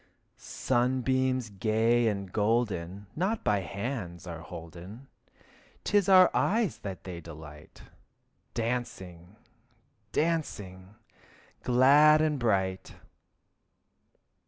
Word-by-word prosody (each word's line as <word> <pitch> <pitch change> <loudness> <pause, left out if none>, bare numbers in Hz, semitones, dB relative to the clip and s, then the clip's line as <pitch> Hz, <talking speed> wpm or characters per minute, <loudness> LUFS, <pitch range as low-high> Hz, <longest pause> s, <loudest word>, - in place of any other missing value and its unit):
Sunbeams 130 -1 0
gay 115 +4 +2
and 100 -3 -3
golden 105 -4 -1
Not 195 +7 -1
by 105 -1 +2
hands 100 -3 -5
are 85 -2 -7
holden. 85 - -10 0.7
'Tis 205 -2 +2
our 185 -1 +7
eyes 220 -1 +1
that 95 -3 -7
they 90 -2 -7
delight, 75 -2 -12 0.7
Dancing, 100 -7 -4 0.8
dancing, 105 - -2 0.7
glad 140 +5 +6
and 155 -2 +1
bright. 95 -5 -1
110 Hz, 85 wpm, -29 LUFS, 95-130 Hz, 0.8 s, our